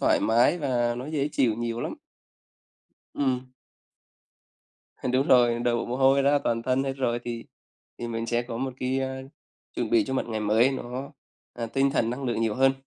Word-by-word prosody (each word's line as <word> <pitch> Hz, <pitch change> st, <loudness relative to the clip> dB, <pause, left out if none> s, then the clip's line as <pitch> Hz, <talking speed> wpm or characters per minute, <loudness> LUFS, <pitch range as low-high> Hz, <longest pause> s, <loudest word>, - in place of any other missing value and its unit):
thoải -, -, +3 dB
mái 120 Hz, +9 st, +3 dB
và 120 Hz, -5 st, 0 dB
nó 130 Hz, -, -6 dB
dễ 150 Hz, -2 st, -1 dB
chịu 120 Hz, -5 st, +2 dB
nhiều 115 Hz, +1 st, -3 dB
lắm. -, -, -3 dB, 1.2 s
Ừm. 130 Hz, -2 st, -1 dB, 1.6 s
Đúng 130 Hz, +2 st, +2 dB
rồi, 120 Hz, -2 st, +5 dB
đổ 120 Hz, -1 st, 0 dB
mồ 125 Hz, -, -3 dB
hôi 135 Hz, +1 st, +4 dB
ra 145 Hz, +1 st, +4 dB
toàn 115 Hz, 0 st, 0 dB
thân 130 Hz, +2 st, +1 dB
hết 135 Hz, -, -1 dB
rồi 125 Hz, -3 st, -1 dB
thì 115 Hz, -1 st, -5 dB, 0.5 s
thì 120 Hz, -, -4 dB
mình 115 Hz, 0 st, -3 dB
sẽ 120 Hz, +1 st, 0 dB
có 120 Hz, -1 st, -6 dB
một 130 Hz, +1 st, -2 dB
cái 130 Hz, +1 st, 0 dB
á, 130 Hz, 0 st, -3 dB, 0.5 s
chuẩn 120 Hz, -3 st, -2 dB
bị 115 Hz, -3 st, +4 dB
cho 130 Hz, -, -3 dB
một -, -, -1 dB
ngày 110 Hz, -1 st, -2 dB
mới 110 Hz, +5 st, +3 dB
nó, 130 Hz, +3 st, -5 dB, 0.4 s
à, 120 Hz, -1 st, -4 dB
tinh 135 Hz, +4 st, +1 dB
thần 115 Hz, -3 st, +1 dB
năng 130 Hz, +3 st, -4 dB
lượng 120 Hz, -2 st, -1 dB
nhiều 110 Hz, -2 st, +1 dB
hơn. 135 Hz, +2 st, +4 dB
125 Hz, 190 wpm, -26 LUFS, 115-135 Hz, 1.6 s, rồi